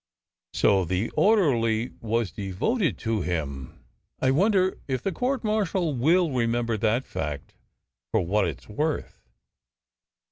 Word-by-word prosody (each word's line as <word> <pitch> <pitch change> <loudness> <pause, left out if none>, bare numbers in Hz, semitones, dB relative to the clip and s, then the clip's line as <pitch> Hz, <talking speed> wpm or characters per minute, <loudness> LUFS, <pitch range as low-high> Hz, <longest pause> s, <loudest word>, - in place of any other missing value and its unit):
" - - -66
So 95 -2 +3
the 95 +5 -1
orderly 125 - +2
was 115 -3 -1
devoted 105 - -1
to 110 -2 0
him! 70 -7 -4 0.4
I 130 - +2
wonder 190 +4 +2
if 130 -3 -2
the 195 - 0
court 250 +7 -1
martial 195 -6 0
will 160 +6 +3
remember 115 -2 0
that 115 +4 +1
fact 70 -1 -5 0.6
for - - +2
what 100 +2 +2
it 80 - -6
s - - -20
worth?" 150 +8 -3
120 Hz, 135 wpm, -26 LUFS, -, 0.6 s, So